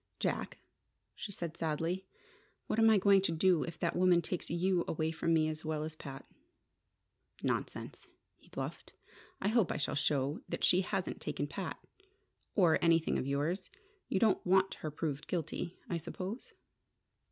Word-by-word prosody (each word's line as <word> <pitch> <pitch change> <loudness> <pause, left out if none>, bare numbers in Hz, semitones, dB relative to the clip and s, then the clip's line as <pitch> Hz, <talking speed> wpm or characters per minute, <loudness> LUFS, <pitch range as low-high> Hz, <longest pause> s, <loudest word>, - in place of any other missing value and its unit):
"Jack," - - -1 0.6
she 205 - -6
said, 170 -4 -5
sadly, 165 +4 -1 0.6
"what 220 - 0
am 225 0 +7
I 220 - +6
going 195 0 +5
to 190 - 0
do 170 0 +3
if 165 +1 -4
that 170 - -1
woman 180 -1 +5
takes 180 - -4
you 175 +1 +2
away 160 0 0
from 165 0 -1
me 160 -1 +4
as 155 0 -3
well 155 -1 -1
as 155 0 -5
Pat?" 135 -3 -8 1.2
"Nonsense," - - -3 0.3
he - - -23
bluffed. - - -6 0.5
"I 195 - +1
hope 220 -4 +3
I - - -1
shall 145 - -1
show 145 0 +1
that - - -3
she 180 - +5
hasn't 190 0 -2
taken - - -2
Pat - - -5 0.8
or 175 -6 +5
anything 165 -1 +3
of 130 - -3
yours. 150 +7 -1 0.4
You 190 - +2
don't 220 -1 +3
want 190 +1 +4
her 155 - -5
proved 150 -1 -3
guilty, 170 +1 -3
I 170 - -1
suppose?" 185 +8 -6
170 Hz, 165 wpm, -33 LUFS, 155-190 Hz, 1.2 s, am